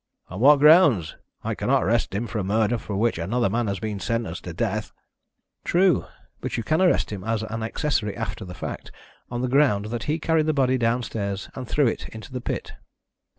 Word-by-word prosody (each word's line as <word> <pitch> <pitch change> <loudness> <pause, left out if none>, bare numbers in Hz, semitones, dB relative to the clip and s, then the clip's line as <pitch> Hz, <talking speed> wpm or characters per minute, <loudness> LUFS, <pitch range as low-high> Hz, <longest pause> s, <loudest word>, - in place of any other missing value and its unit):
"On 95 - -7
what 145 +5 +7
grounds? 145 - +5 0.3
I - - -1
cannot - - +1
arrest 110 -1 0
him 110 +4 -1
for 115 -1 -4
a - - -1
murder 110 +4 +1
for 105 - -5
which 115 -4 +1
another 105 +5 0
man 115 +1 0
has 100 -1 -1
been 105 -2 -4
sentenced 115 +2 -3
to - - -5
death." - - -2 0.7
"True. 180 0 +3 0.3
But - - -4
you 115 - -2
can 155 +9 +1
arrest 180 -10 +3
him 100 -3 -5
as 110 0 -1
accessory 110 +1 -2
after 110 -1 -4
the 90 -1 -8
fact, - - -6 0.4
on 120 0 -3
the - - +1
ground 125 -6 +3
that 120 -1 -3
he 155 +2 0
carried 160 -1 +1
the 155 - +2
body 130 -2 +2
downstairs 115 -4 -2
and 130 -2 -7
threw 145 +5 +2
it 115 - -2
into 110 +3 -10
the 125 - -4
pit." - - -4
115 Hz, 200 wpm, -24 LUFS, 105-135 Hz, 0.7 s, what